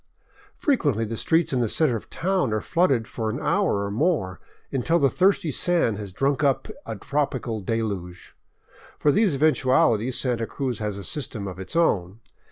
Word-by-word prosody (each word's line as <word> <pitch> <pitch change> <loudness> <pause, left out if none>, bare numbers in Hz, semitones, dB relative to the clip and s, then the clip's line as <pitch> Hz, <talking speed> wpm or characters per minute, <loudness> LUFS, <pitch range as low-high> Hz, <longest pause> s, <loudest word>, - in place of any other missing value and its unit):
Frequently 145 - +1
the 115 +1 -4
streets 160 +6 +1
in 130 - +1
the 115 - 0
center 150 -3 +2
of 110 - -7
town 180 - 0
are 110 - +1
flooded 135 - +1
for 110 -1 -3
an 120 +5 -3
hour 155 - +1
or 100 - -4
more, 110 - 0 0.3
until 150 +6 +1
the 140 -5 +3
thirsty 185 -4 +2
sand 150 - +1
has 100 -2 -6
drunk 135 +8 0
up 140 -2 +1 0.2
a 115 - -4
tropical 130 -1 -2
deluge. 100 -4 -4 0.6
For 150 - +3
these 205 -3 +2
eventualities 130 -4 +2
Santa 120 -3 0
Cruz 130 -5 -3
has 105 -2 -3
a 100 - -7
system 115 -3 -4
of 90 -1 -7
its 95 - -6
own. 100 - +1
125 Hz, 175 wpm, -24 LUFS, 105-150 Hz, 0.6 s, the